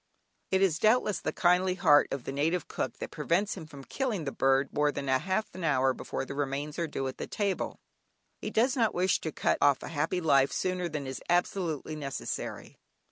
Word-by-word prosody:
It 190 Hz, 0 st, +3 dB
is, 170 Hz, -4 st, +2 dB
doubtless, 215 Hz, -2 st, +3 dB
the -, -, -2 dB
kindly 180 Hz, +1 st, +3 dB
heart 155 Hz, -6 st, +5 dB
of 135 Hz, -3 st, -3 dB
the -, -, -4 dB
native 160 Hz, +6 st, 0 dB
cook -, -, -3 dB
that -, -, -6 dB
prevents 170 Hz, +7 st, 0 dB
him 165 Hz, -5 st, -8 dB, 0.2 s
killing 230 Hz, -, -2 dB
the 140 Hz, -, -3 dB
bird 135 Hz, +1 st, +2 dB
more 150 Hz, 0 st, +2 dB
than 140 Hz, -1 st, -5 dB
half 185 Hz, +11 st, 0 dB
an 185 Hz, -, -7 dB
hour 135 Hz, -4 st, +3 dB
before 135 Hz, -, -4 dB
the 140 Hz, -, -6 dB
remains 145 Hz, +2 st, -3 dB
are 170 Hz, -, 0 dB
due 135 Hz, -3 st, -3 dB
at 130 Hz, -, -6 dB
table; 200 Hz, -3 st, -2 dB, 0.6 s
he -, -, -3 dB
does 245 Hz, +5 st, +2 dB
not 230 Hz, -4 st, +1 dB
wish 180 Hz, +1 st, +2 dB
to 160 Hz, -, -3 dB
cut -, -, 0 dB
off 145 Hz, -2 st, +4 dB
a -, -, -6 dB
happy 165 Hz, +3 st, -1 dB
life 140 Hz, -5 st, +4 dB
sooner 180 Hz, -1 st, -1 dB
than 150 Hz, -3 st, -4 dB
is 130 Hz, 0 st, -5 dB
absolutely 175 Hz, -3 st, 0 dB
necessary. 140 Hz, -3 st, -5 dB
160 Hz, 195 wpm, -29 LUFS, 140-185 Hz, 0.6 s, heart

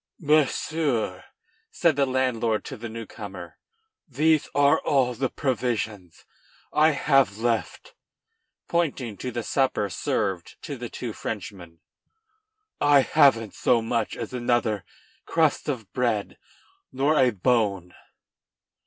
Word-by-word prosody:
"Monsieur," 145 Hz, -, +1 dB, 0.5 s
said 165 Hz, -4 st, +2 dB
the 140 Hz, -1 st, +2 dB
landlord 120 Hz, -5 st, 0 dB
to 135 Hz, -, -6 dB
the 120 Hz, -1 st, -7 dB
new 115 Hz, 0 st, -7 dB
comer, 95 Hz, -5 st, -9 dB, 0.5 s
"these 155 Hz, +2 st, +2 dB
are 145 Hz, 0 st, +4 dB
all 130 Hz, -3 st, +1 dB
the 130 Hz, +2 st, -1 dB
provisions 115 Hz, -, -3 dB, 0.5 s
I 155 Hz, +1 st, +5 dB
have 135 Hz, -7 st, +2 dB
left," 120 Hz, -, -2 dB, 0.7 s
pointing 140 Hz, -10 st, -1 dB
to 125 Hz, -, -4 dB
the 120 Hz, -1 st, -4 dB
supper 120 Hz, -6 st, 0 dB
served 95 Hz, 0 st, -2 dB
to 145 Hz, -, -5 dB
the 120 Hz, -2 st, -7 dB
two 120 Hz, -3 st, -6 dB
Frenchmen; 90 Hz, -7 st, -7 dB, 1.0 s
"I 145 Hz, -1 st, +5 dB
haven't 130 Hz, -7 st, +3 dB
so 120 Hz, -, +2 dB
much 115 Hz, -1 st, -1 dB
as 115 Hz, +1 st, -6 dB
another 120 Hz, -4 st, 0 dB, 0.4 s
crust 160 Hz, -2 st, +1 dB
of 115 Hz, -8 st, -5 dB
bread 115 Hz, -5 st, -1 dB, 0.5 s
nor 140 Hz, +4 st, +1 dB
a 130 Hz, -4 st, +5 dB
bone." 100 Hz, -4 st, 0 dB
120 Hz, 120 wpm, -25 LUFS, 105-140 Hz, 1.0 s, I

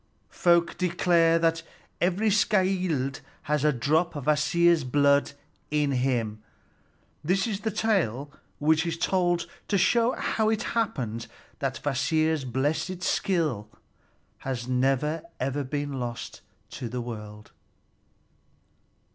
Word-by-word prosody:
Folk 170 Hz, -1 st, +2 dB
declare 170 Hz, -2 st, +3 dB
that 165 Hz, 0 st, +1 dB, 0.4 s
every 190 Hz, +5 st, +2 dB
skald 185 Hz, -, +1 dB, 0.2 s
has 150 Hz, -1 st, 0 dB
a 150 Hz, -, +4 dB
drop 155 Hz, +7 st, +1 dB
of 145 Hz, -, -5 dB
Kvasir's 165 Hz, +2 st, +3 dB
blood 140 Hz, +2 st, +3 dB, 0.4 s
in 150 Hz, -1 st, +1 dB
him. 120 Hz, -5 st, -1 dB, 0.8 s
This 185 Hz, +5 st, +1 dB
is 210 Hz, -4 st, -2 dB
the 220 Hz, -, -2 dB
tale 175 Hz, -, 0 dB, 0.3 s
which 155 Hz, +2 st, +3 dB
is 165 Hz, 0 st, -2 dB
told 175 Hz, -1 st, +1 dB, 0.2 s
to 200 Hz, -, +1 dB
show 235 Hz, +6 st, +3 dB
how 220 Hz, -1 st, 0 dB
it 220 Hz, +1 st, 0 dB
happened 125 Hz, -, -2 dB, 0.3 s
that -, -, -3 dB
Kvasir's 150 Hz, +2 st, +1 dB
blessed 150 Hz, +8 st, -1 dB
skill 155 Hz, -, 0 dB, 0.7 s
has 125 Hz, -2 st, -4 dB
never 135 Hz, +5 st, +1 dB, 0.5 s
been 145 Hz, -2 st, -3 dB
lost 120 Hz, -1 st, -5 dB, 0.3 s
to 120 Hz, -, -5 dB
the 125 Hz, +2 st, -4 dB
world. 105 Hz, -3 st, -8 dB
155 Hz, 115 wpm, -27 LUFS, 130-180 Hz, 0.8 s, a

